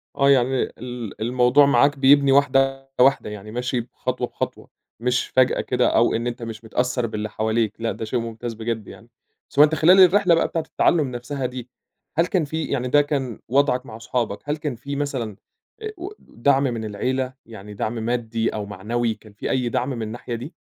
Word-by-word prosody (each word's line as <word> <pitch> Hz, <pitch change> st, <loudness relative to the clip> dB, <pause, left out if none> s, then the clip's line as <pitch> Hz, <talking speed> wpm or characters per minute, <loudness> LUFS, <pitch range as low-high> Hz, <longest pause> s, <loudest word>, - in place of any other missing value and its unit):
آه 140 Hz, 0 st, +3 dB
يعني 130 Hz, -1 st, +3 dB, 0.2 s
ال 120 Hz, -3 st, -7 dB
الموضوع 125 Hz, +4 st, +4 dB
معاك 140 Hz, 0 st, +3 dB
بيبني 140 Hz, 0 st, +5 dB
واحدة، 135 Hz, -1 st, +2 dB
واحدة، 130 Hz, -4 st, +4 dB
يعني 105 Hz, 0 st, -8 dB
ماشي 125 Hz, +1 st, -2 dB
ب 120 Hz, -, -14 dB
خطوة، 125 Hz, -1 st, -3 dB
بخطوة، -, -, -5 dB, 0.3 s
مش 125 Hz, +1 st, 0 dB
فجأة 130 Hz, 0 st, +2 dB
كده 125 Hz, -1 st, +1 dB
أو 120 Hz, -, +4 dB
إن 115 Hz, +1 st, -1 dB
أنت 120 Hz, 0 st, -5 dB
مش 115 Hz, -1 st, -7 dB
متأثّر 125 Hz, +1 st, -1 dB
باللي 110 Hz, 0 st, -4 dB
حواليك 110 Hz, 0 st, 0 dB
لأ 115 Hz, -, 0 dB
ده 110 Hz, -, -5 dB
شيء 120 Hz, +3 st, -1 dB
ممتاز 115 Hz, 0 st, -5 dB
بجد 110 Hz, -1 st, -4 dB
يعني، 115 Hz, +2 st, -13 dB, 0.4 s
س 140 Hz, -, -4 dB
وأنت 150 Hz, +1 st, +7 dB
خلال 180 Hz, +5 st, +6 dB
الرحلة 185 Hz, -1 st, +6 dB
بقى -, -, +2 dB
بتاعة 165 Hz, -, -2 dB
التعلّم 150 Hz, -7 st, +2 dB
نَفْسها 125 Hz, +2 st, -4 dB
دي، 125 Hz, -1 st, -6 dB, 0.5 s
هل 170 Hz, -, +3 dB
كان 180 Hz, -4 st, 0 dB
في 160 Hz, +2 st, -3 dB
يعني 125 Hz, -2 st, -2 dB
ده 145 Hz, +3 st, +5 dB
كان 135 Hz, -6 st, -3 dB
وضعك 130 Hz, 0 st, +2 dB
مع 110 Hz, -1 st, -9 dB
صحابك 115 Hz, -2 st, -2 dB
هل 150 Hz, -, 0 dB
كان 150 Hz, -4 st, -4 dB
في 140 Hz, +5 st, -6 dB
مثلًا، 130 Hz, -8 st, -3 dB, 0.5 s
أ 435 Hz, -, -4 dB
و 360 Hz, +3 st, -6 dB
دعم 135 Hz, +3 st, +1 dB
من 120 Hz, -5 st, -2 dB
العيلة؟ 130 Hz, +5 st, -2 dB
يعني 105 Hz, -2 st, -10 dB
دعم 110 Hz, +3 st, -3 dB
مادي 115 Hz, 0 st, -1 dB
أو 105 Hz, -1 st, -4 dB
معنوي 110 Hz, +4 st, -2 dB
كان 110 Hz, -1 st, -17 dB
في 105 Hz, -, -5 dB
أي 125 Hz, -2 st, 0 dB
دعم 125 Hz, +3 st, -1 dB
من 125 Hz, -4 st, -4 dB
الناحية 115 Hz, +2 st, -5 dB
دي؟ 130 Hz, +9 st, -8 dB
125 Hz, 195 wpm, -22 LUFS, 115-140 Hz, 0.5 s, وأنت